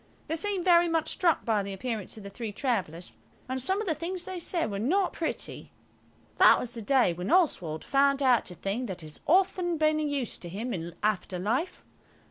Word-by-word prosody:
They 320 Hz, -, -1 dB
seemed 380 Hz, +1 st, -1 dB
very 345 Hz, -1 st, +6 dB
much 325 Hz, -1 st, 0 dB
struck 340 Hz, -3 st, +1 dB
by 220 Hz, -3 st, +2 dB
the 195 Hz, 0 st, -5 dB
appearance 220 Hz, 0 st, -4 dB
of 215 Hz, -, -10 dB
the 200 Hz, -, -8 dB
three 220 Hz, +1 st, -5 dB
travellers, 190 Hz, -, -3 dB, 0.3 s
and 260 Hz, +1 st, -2 dB
some 380 Hz, +10 st, +1 dB
of 430 Hz, -, -3 dB
the 325 Hz, -, +2 dB
things 350 Hz, +3 st, -4 dB
they 375 Hz, -1 st, -5 dB
said 335 Hz, -, -1 dB
were 200 Hz, -, -3 dB
not 360 Hz, -, +1 dB
pretty. 325 Hz, -, -4 dB, 0.7 s
That -, -, +8 dB
was 240 Hz, -1 st, -4 dB
the 230 Hz, -, -3 dB
day 250 Hz, -5 st, +3 dB
when 180 Hz, +2 st, -5 dB
Oswald 200 Hz, -, +2 dB
found 275 Hz, 0 st, +2 dB
out 250 Hz, -5 st, +3 dB
a 180 Hz, -, -9 dB
thing 210 Hz, +8 st, -3 dB
that 185 Hz, -3 st, -5 dB
has 155 Hz, -1 st, -6 dB
often 360 Hz, 0 st, +2 dB
been 310 Hz, 0 st, +2 dB
of 305 Hz, -, 0 dB
use 280 Hz, -5 st, -2 dB
to 175 Hz, -, -6 dB
him 225 Hz, +8 st, -4 dB
in 170 Hz, -1 st, -5 dB
after 205 Hz, -3 st, 0 dB
life. 230 Hz, -, -2 dB
255 Hz, 210 wpm, -28 LUFS, 200-335 Hz, 0.7 s, That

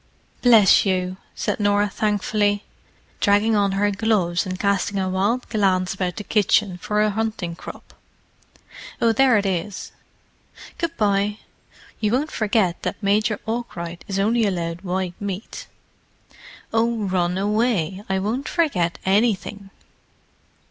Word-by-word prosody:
"Bless 225 Hz, -6 st, +6 dB
you!" 185 Hz, -1 st, -1 dB, 0.2 s
said -, -, -2 dB
Norah 205 Hz, 0 st, +2 dB
thankfully, 205 Hz, 0 st, 0 dB, 0.6 s
dragging 205 Hz, +2 st, +3 dB
on 200 Hz, -2 st, +2 dB
her 205 Hz, +1 st, +1 dB
gloves 195 Hz, -4 st, 0 dB
and 185 Hz, 0 st, -4 dB
casting 200 Hz, 0 st, 0 dB
a 190 Hz, -1 st, 0 dB
wild 200 Hz, +7 st, 0 dB
glance 190 Hz, -4 st, +1 dB
about 185 Hz, -2 st, -2 dB
the 210 Hz, -, -5 dB
kitchen 205 Hz, -3 st, +2 dB
for 210 Hz, +2 st, 0 dB
her 215 Hz, -, +2 dB
hunting 215 Hz, -5 st, -3 dB
crop. -, -, -11 dB, 1.1 s
"Oh, 230 Hz, -, +3 dB
there 255 Hz, 0 st, +4 dB
it 205 Hz, -, 0 dB
is. 190 Hz, +1 st, -3 dB, 0.9 s
Good 335 Hz, -1 st, -2 dB
bye. 205 Hz, 0 st, +1 dB, 0.6 s
You 215 Hz, 0 st, 0 dB
won't 290 Hz, +5 st, 0 dB
forget 210 Hz, -5 st, 0 dB
that -, -, -2 dB
Major 210 Hz, +2 st, +2 dB
Arkwright 175 Hz, -7 st, -4 dB
is 195 Hz, -2 st, -3 dB
only 225 Hz, +4 st, +2 dB
allowed 170 Hz, -2 st, -3 dB
white 185 Hz, -1 st, -2 dB
meat?" 200 Hz, +1 st, -6 dB, 1.1 s
"Oh, 225 Hz, -1 st, +1 dB
run 180 Hz, -2 st, 0 dB
away—I 200 Hz, -2 st, 0 dB
won't 220 Hz, +8 st, -2 dB
forget 195 Hz, -, 0 dB
anything." 200 Hz, 0 st, 0 dB
205 Hz, 130 wpm, -22 LUFS, 185-220 Hz, 1.1 s, Bless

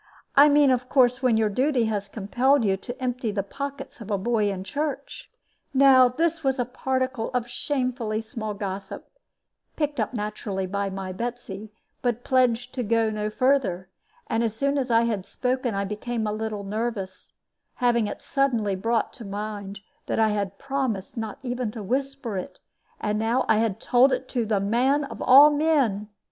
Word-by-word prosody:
I 285 Hz, +2 st, +8 dB
mean, 290 Hz, -2 st, +5 dB
of 255 Hz, 0 st, 0 dB
course, 250 Hz, -1 st, +3 dB
when 250 Hz, -4 st, +3 dB
your 220 Hz, -1 st, +3 dB
duty 255 Hz, +2 st, +1 dB
has 205 Hz, -2 st, -2 dB
compelled 245 Hz, +6 st, +1 dB
you 195 Hz, -1 st, +2 dB
to 240 Hz, +6 st, -8 dB
empty 250 Hz, -2 st, -2 dB
the 200 Hz, -1 st, -1 dB
pockets 280 Hz, +4 st, -7 dB
of 215 Hz, -, -8 dB
a 205 Hz, -, +1 dB
boy 210 Hz, 0 st, +1 dB
in 190 Hz, -1 st, -5 dB
church." 280 Hz, +7 st, -4 dB, 0.5 s
Now 260 Hz, -1 st, +7 dB
this 325 Hz, +5 st, -1 dB
was 270 Hz, 0 st, +1 dB
a 245 Hz, -, 0 dB
particle 260 Hz, -1 st, -2 dB
of 245 Hz, -1 st, 0 dB
shamefully 250 Hz, -4 st, -2 dB
small 220 Hz, -1 st, -5 dB
gossip, 195 Hz, -1 st, -6 dB, 0.7 s
picked 295 Hz, -2 st, -2 dB
up -, -, 0 dB
naturally 210 Hz, -3 st, -3 dB
by 200 Hz, +1 st, -2 dB
my 190 Hz, -1 st, -5 dB
Betsy, 220 Hz, -1 st, -6 dB, 0.3 s
but 245 Hz, -1 st, -1 dB
pledged 250 Hz, -2 st, +2 dB
to 260 Hz, -, -2 dB
go 225 Hz, 0 st, +2 dB
no 210 Hz, 0 st, -2 dB
further; 215 Hz, -7 st, +1 dB, 0.4 s
and 225 Hz, +1 st, 0 dB
as 225 Hz, -2 st, -1 dB
soon 280 Hz, +4 st, +1 dB
as 260 Hz, -2 st, -2 dB
I 230 Hz, 0 st, +4 dB
had 220 Hz, -5 st, -1 dB
spoken 250 Hz, -3 st, -1 dB
I 200 Hz, 0 st, -1 dB
became 220 Hz, +3 st, -3 dB
a 210 Hz, -, -1 dB
little 215 Hz, -1 st, -4 dB
nervous, 210 Hz, -1 st, -4 dB, 0.4 s
having 235 Hz, -3 st, +2 dB
it -, -, -7 dB
suddenly 240 Hz, -7 st, +1 dB
brought 225 Hz, +4 st, 0 dB
to 250 Hz, -, -9 dB
my 200 Hz, -, -8 dB, 0.3 s
mind 195 Hz, 0 st, -9 dB, 0.3 s
that -, -, -1 dB
I 220 Hz, -1 st, +4 dB
had 200 Hz, -2 st, -2 dB
promised 265 Hz, -8 st, -3 dB
not 220 Hz, -3 st, -4 dB
even 245 Hz, -2 st, -2 dB
to 220 Hz, -, -6 dB
whisper 265 Hz, -2 st, -2 dB
it; -, -, -8 dB, 0.4 s
and 210 Hz, 0 st, -1 dB
now 230 Hz, +3 st, +1 dB
I 220 Hz, -, +4 dB
had 220 Hz, -2 st, 0 dB
told 250 Hz, +4 st, +4 dB
it 260 Hz, -, -2 dB
to 235 Hz, -4 st, -1 dB
the 210 Hz, -2 st, +1 dB
man 250 Hz, +8 st, +2 dB
of 275 Hz, -, -8 dB
all 280 Hz, +4 st, +8 dB
men! 280 Hz, -10 st, +1 dB
235 Hz, 180 wpm, -25 LUFS, 210-260 Hz, 0.7 s, I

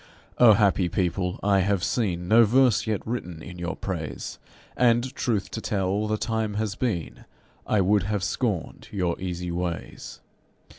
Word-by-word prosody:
O 120 Hz, -3 st, +8 dB
happy 100 Hz, -3 st, +3 dB
people! 90 Hz, 0 st, -1 dB
I 100 Hz, -1 st, +3 dB
have 95 Hz, 0 st, +1 dB
seen 90 Hz, -7 st, -1 dB
No 115 Hz, +4 st, +7 dB
verse 120 Hz, -3 st, +3 dB
yet 110 Hz, -3 st, -2 dB
written 90 Hz, -9 st, -5 dB
in 90 Hz, 0 st, -9 dB
your 85 Hz, -1 st, -3 dB
praise, 80 Hz, -7 st, -5 dB, 0.4 s
And, 120 Hz, +1 st, +2 dB
truth 110 Hz, -7 st, -1 dB
to 110 Hz, -, -4 dB
tell, 100 Hz, +1 st, -1 dB
the 110 Hz, 0 st, 0 dB
time 110 Hz, -2 st, -2 dB
has 105 Hz, -1 st, -1 dB
been 105 Hz, -8 st, -3 dB, 0.4 s
I 105 Hz, -, +3 dB
would 100 Hz, +2 st, +3 dB
have 100 Hz, +1 st, -2 dB
scorned -, -, -2 dB
your 90 Hz, -4 st, 0 dB
easy 90 Hz, -1 st, -4 dB
ways. 85 Hz, -1 st, -5 dB
100 Hz, 155 wpm, -25 LUFS, 90-110 Hz, 0.4 s, O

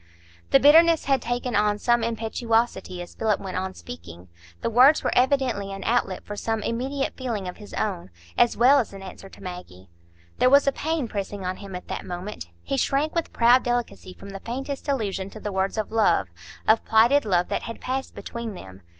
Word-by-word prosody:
The 275 Hz, -, +6 dB
bitterness 325 Hz, +3 st, +6 dB
had 275 Hz, -1 st, +2 dB
taken 245 Hz, 0 st, -2 dB
on 210 Hz, 0 st, +2 dB
some 240 Hz, +2 st, +2 dB
impetuosity 225 Hz, -4 st, -1 dB
as 175 Hz, -, -13 dB
Philip 215 Hz, -2 st, 0 dB
went 190 Hz, -2 st, -6 dB
on 190 Hz, 0 st, -3 dB
speaking; 85 Hz, +1 st, -11 dB, 0.3 s
the -, -, -1 dB
words 260 Hz, +7 st, +6 dB
were -, -, 0 dB
evidently 250 Hz, -6 st, +1 dB
an 195 Hz, 0 st, -6 dB
outlet 230 Hz, -5 st, 0 dB
for 205 Hz, -, -6 dB
some 225 Hz, +1 st, -2 dB
immediate 270 Hz, +4 st, -2 dB
feeling 230 Hz, -7 st, -4 dB
of 180 Hz, -, -7 dB
his 210 Hz, -1 st, -12 dB
own, 190 Hz, -, -2 dB, 0.3 s
as 240 Hz, -, +3 dB
well 265 Hz, +4 st, +6 dB
as 225 Hz, -, -3 dB
an 195 Hz, 0 st, -9 dB
answer 195 Hz, +1 st, -10 dB
to -, -, -15 dB
Maggie. 95 Hz, -, -9 dB, 0.5 s
There -, -, +5 dB
was 280 Hz, +2 st, +6 dB
a 275 Hz, -, +3 dB
pain 315 Hz, -1 st, -2 dB
pressing 200 Hz, -2 st, -5 dB
on 185 Hz, +1 st, -3 dB
him 195 Hz, -2 st, -9 dB
at 180 Hz, -, -8 dB
that -, -, -5 dB
moment. 180 Hz, -, -6 dB, 0.2 s
He 275 Hz, -, -2 dB
shrank 280 Hz, +4 st, 0 dB
with 335 Hz, -1 st, -2 dB
proud 240 Hz, +2 st, +5 dB
delicacy 240 Hz, -6 st, -3 dB
from 200 Hz, -, -11 dB
the 195 Hz, -, -7 dB
faintest 270 Hz, +6 st, -5 dB
allusion 200 Hz, -7 st, -2 dB
to 215 Hz, -, -10 dB
the 210 Hz, -, -4 dB
words 190 Hz, +2 st, -1 dB
of 215 Hz, -1 st, -2 dB
love, 175 Hz, -, +2 dB, 0.4 s
of 220 Hz, +1 st, +4 dB
plighted 235 Hz, +6 st, +4 dB
love 180 Hz, -4 st, +1 dB
that -, -, -1 dB
had 230 Hz, -, -7 dB
passed 265 Hz, +1 st, -4 dB
between 235 Hz, -3 st, -6 dB
them. 95 Hz, -, -11 dB
220 Hz, 200 wpm, -25 LUFS, 190-255 Hz, 0.5 s, The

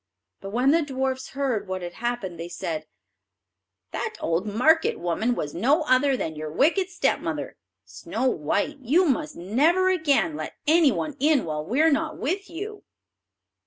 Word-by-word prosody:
But 195 Hz, -, -7 dB
when 250 Hz, +6 st, +2 dB
the 335 Hz, +2 st, +4 dB
dwarfs 265 Hz, -2 st, -2 dB
heard 245 Hz, -8 st, -1 dB
what 185 Hz, -1 st, -4 dB
had 175 Hz, 0 st, -6 dB
happened, 225 Hz, -7 st, -4 dB
they 170 Hz, -, -5 dB
said: 160 Hz, -2 st, -4 dB, 1.0 s
"That -, -, -3 dB
old 165 Hz, +5 st, -1 dB
market 255 Hz, +11 st, +3 dB
woman 195 Hz, +8 st, 0 dB
was 145 Hz, -8 st, -4 dB
no 275 Hz, -, +2 dB
other 270 Hz, -1 st, +3 dB
than 160 Hz, -8 st, -3 dB
your 155 Hz, 0 st, -5 dB
wicked 345 Hz, -, +2 dB
stepmother. 360 Hz, -, -1 dB, 0.3 s
Snow -, -, -4 dB
white, 205 Hz, -, -1 dB
you 290 Hz, +9 st, +3 dB
must 305 Hz, 0 st, 0 dB
never 305 Hz, -, +2 dB
again 315 Hz, -3 st, +2 dB
let -, -, -6 dB
anyone 280 Hz, -, +3 dB
in 295 Hz, 0 st, +3 dB
while 150 Hz, -1 st, -3 dB
we 240 Hz, -, 0 dB
are 325 Hz, -, +5 dB
not 315 Hz, +2 st, 0 dB
with 380 Hz, +9 st, -2 dB
you." 410 Hz, +5 st, -7 dB
260 Hz, 160 wpm, -25 LUFS, 185-315 Hz, 1.0 s, are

